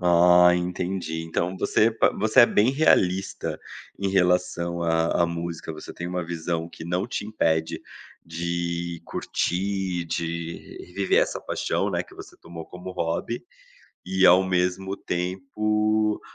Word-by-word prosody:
Ah 90 0 +6
entendi, 90 -1 -3
então 85 +3 -2
você 115 +2 +3
pa 110 - +2
você 110 +5 +4
é 120 - +9
bem 110 +4 +3
realista 95 - +1 0.4
em 100 -1 -1
relação 90 -2 +1
a 80 0 +2
a - - +1
música, 85 -1 -5
você 75 - -9
tem 85 - -6
uma 90 -1 -3
visão 85 0 -3
que 80 - -10
não 90 +3 -1
te 105 - -4
impede 80 -6 0 0.4
de 85 0 -3
curtir, 95 -1 -2
de 85 0 -5
reviver 95 +2 +1
essa - - -3
paixão, - - -1
né, - - -1
que - - -17
você - - -12
tomou 85 -1 -10
como 90 +1 -8
hobby, 90 +8 -3 0.6
e 95 0 +3
ao 90 +2 +7
mesmo 95 +1 -1
tempo, 105 +3 0
90 Hz, 140 wpm, -25 LUFS, 85-95 Hz, 0.6 s, é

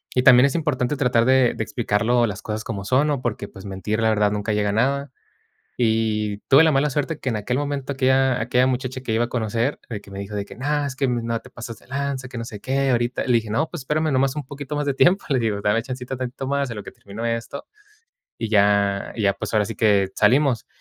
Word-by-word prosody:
Y 125 - +4
también 125 0 +8
es 140 - +1
importante 150 -5 0
tratar 125 -4 +2
de 130 -1 +4
de - - -2
explicarlo. 115 +2 +1
Las 100 -1 -5
cosas 110 0 -4
como 100 -4 -5
son, 130 +6 +3
¿no? 145 -4 -1
Porque 110 -4 -3
pues 95 - -12
mentir, 100 +3 -3
la 110 - +3
verdad 105 -1 +2
nunca 105 +1 -2
llega 105 -1 +1
nada. 135 +6 0 0.7
Y 110 -3 0
tuve 140 +4 +8
la 160 - +4
mala 145 +1 +2
suerte 145 +3 -2
que - - -8
en 115 - -1
aquel 125 +5 -2
momento, 145 -1 -3
aquella 130 -1 +2
aquella 125 +2 +2
muchacha 130 0 -2
que 125 -3 -4
iba 115 +2 +2
a - - -10
conocer, 115 +3 -1
de 110 -3 -4
que 100 - -15
me 100 - -7
dijo: 100 +1 -6
"De 100 - -2
que - - -12
no, 145 +2 -1
es 140 - -4
que 135 0 0
no 115 -1 -1
te 125 - -15
pases 115 -1 -8
de - - -23
lanza, 140 -1 -3
que 120 - -8
no 115 - -4
sé 105 -3 -9
qué". 135 +1 0
Ahorita 120 0 0
le 125 - +2
dije: 115 -2 +1
"No, 155 +9 0
pues, 175 - -6
espérame 155 +2 0
nomás 135 +1 +2
un 145 - -4
poquito 145 +1 -6
más 145 - -1
de 140 - +1
tiempo". 185 +7 +3
Le 135 -3 +2
digo: 110 -3 -1
"Dame 105 +3 +2
chancita 130 0 -5
tantito 130 +1 -5
más 140 -1 0
en 115 - -6
lo 105 - -6
que - - -9
terminó 105 +3 -8
esto 115 +4 -3 0.7
y 115 - -3
ya 100 -1 +2
y 110 - -2
ya 100 - +4
pues, - - -6
ahora 105 -1 +3
sí 115 - -5
que 100 -4 +3
salimos". 125 +3 +3
120 Hz, 250 wpm, -22 LUFS, 110-135 Hz, 0.7 s, también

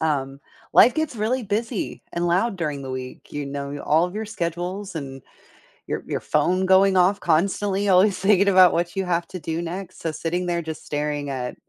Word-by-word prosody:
Um, 140 -4 -1 0.3
life 240 - +7
gets 315 -5 -2
really 235 +4 0
busy 215 +2 -3
and 175 0 -1
loud 195 +6 +1
during 150 -5 -3
the 135 - -6
week- 130 0 -7
you 145 -1 -3
know, 140 +1 -5
all 160 +3 +3
of 180 +2 -5
your 220 - -3
schedules 180 0 -4
and 135 -4 -6 0.7
your - - -3
your - - -2
phone 185 +1 +1
going 190 0 +5
off 185 +3 +3
constantly, 195 +4 +1
always 190 +2 +4
thinking 200 0 +4
about 185 -2 +7
what 175 +2 -1
you 195 - 0
have 175 -1 -1
to 185 - -6
do 160 +1 -3
next, 185 +2 -6
so 165 - -2
sitting 170 +3 -2
there 170 -1 -1
just 160 -1 -7
staring 145 -1 -2
at, 125 -2 -4
175 Hz, 195 wpm, -23 LUFS, 155-195 Hz, 0.7 s, life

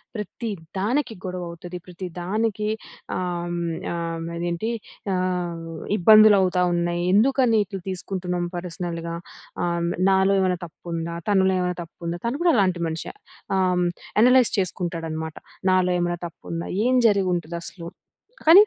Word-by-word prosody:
ప్రతి 220 +2 -4 0.3
దానికి 240 +5 0
గొడవ 180 -1 -3
అవుతది 175 +1 -7
ప్రతి 180 +1 -7
దానికి 210 +3 -1 0.5
ఆహ్, 175 -1 -2
హ్మ్ 170 -1 -2 0.2
ఆహ్, 165 -1 -3
అదేంటి 175 +5 -2 0.5
ఆహ్, 180 -2 -1 0.3
ఇబ్బందులు 215 +2 +8
అవుతా 180 -1 +2
ఉన్నాయి 175 0 0
ఎందుకని 235 +1 +4
ఇట్లా 195 -1 -6
తీసుకుంటున్నాం 180 -1 -2
పర్సనల్‌గా 170 -1 -4 0.5
హ్మ్. 170 -1 0 0.2
నాలో 190 +1 +4
ఏవన్న 185 -1 +2
తప్పుందా? 170 0 -5
తనలో 190 -1 +4
ఏవన్న 180 -1 -1
తప్పుందా? 170 +1 -6
తను 245 +5 -1
కూడా 340 - +5
అలాంటి 185 -5 +2
మనిషే 160 +1 -5 0.4
హ్మ్. 180 -1 +2 0.3
యనలైజ్ 250 +1 +6
చేసుకుంటాడనమాట. 165 -4 -3 0.4
నాలో 185 -1 +3
ఏమైనా 175 0 -1
తప్పుందా? 170 0 -6 0.2
ఏం 255 +1 +4
జరిగుంటదసలు? 175 -3 -1 0.6
కానీ 350 +6 +10
180 Hz, 120 wpm, -24 LUFS, 170-195 Hz, 0.6 s, కానీ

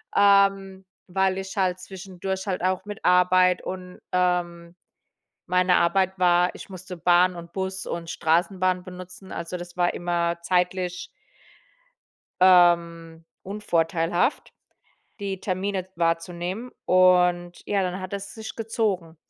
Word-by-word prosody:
ähm, 195 -1 +3 0.2
weil 190 +1 0
ich 190 +2 -6
halt 185 -1 +1
zwischendurch 190 +1 -6
halt 185 -2 -2
auch 185 +1 0
mit 205 -1 -8
Arbeit 180 0 +4
und 180 -1 -7
ähm, 175 -1 -1 0.7
meine 180 0 +3
Arbeit 190 +2 +1
war 180 0 +3
ich - - -11
musste 185 0 -8
Bahn 180 +1 +3
und 170 0 -10
Bus 190 0 -4
und 170 -1 -5
Straßenbahn 180 +2 0
benutzen. 185 +1 -10
Also 170 +2 -5
das 175 0 -10
war 175 0 +1
immer 170 -1 -1
zeitlich 180 - -1 1.3
ähm, 170 -2 +4 0.2
unvorteilhaft, 175 - -1 0.7
die 195 -2 -4
Termine 185 0 -3
wahrzunehmen 175 +7 -2
und 180 -1 +3
ja, 200 -2 0
dann 185 +2 -5
hat 185 +1 -7
es 200 0 -6
sich 220 -1 -8
gezogen. 205 -7 -2
180 Hz, 120 wpm, -24 LUFS, 175-190 Hz, 1.3 s, Arbeit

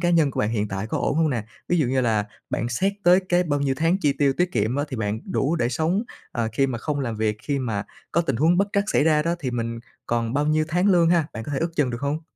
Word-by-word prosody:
cá 175 0 +2
nhân 160 -4 +4
của - - -2
bạn 105 - 0
hiện 105 -2 -1
tại 95 +2 -3
có - - -2
ổn - - 0
hông 160 -1 +3
nè? 115 -5 -2 0.2
Ví 175 - +2
dụ 150 - +2
như 130 +1 +1
là 110 -4 +1 0.2
bạn 115 - -1
xét 190 +12 0
tới 180 +2 +6
cái 175 0 +3
bao 145 -4 -1
nhiêu 135 -1 +1
tháng 165 +3 +3
chi 145 -4 +3
tiêu 140 -2 +3
tiết 180 0 +1
kiệm 115 +3 0
á 145 - 0
thì 130 - -5
bạn 110 0 -2
đủ 150 +5 +1
để 120 - +1
sống, 160 - 0 0.3
ờ, 115 -2 -1
khi 135 +4 +2
mà 125 -3 -3
không 145 +2 -2
làm 120 -5 -3
việc, 105 -1 0
khi 145 -2 -1
mà 110 -6 -2 0.3
có 170 - +3
tình 135 -7 -1
huống 160 +7 +3
bất 200 +2 +2
trắc 200 0 +2
xảy 150 - +3
ra 155 -2 +4
đó 170 +2 0
thì 135 -6 -3
mình 115 -1 -3 0.3
còn 115 -1 -1
bao 145 +1 +1
nhiêu 155 +1 +2
tháng 175 +4 +1
lương 175 -4 +5
ha? 170 -4 +3
Bạn 110 - -6
có 145 - -5
thể 140 - 0
ước 165 +3 -1
chừng 140 -5 +2
được 120 - -5
hông? 145 +3 -2
140 Hz, 300 wpm, -24 LUFS, 115-165 Hz, 0.3 s, tới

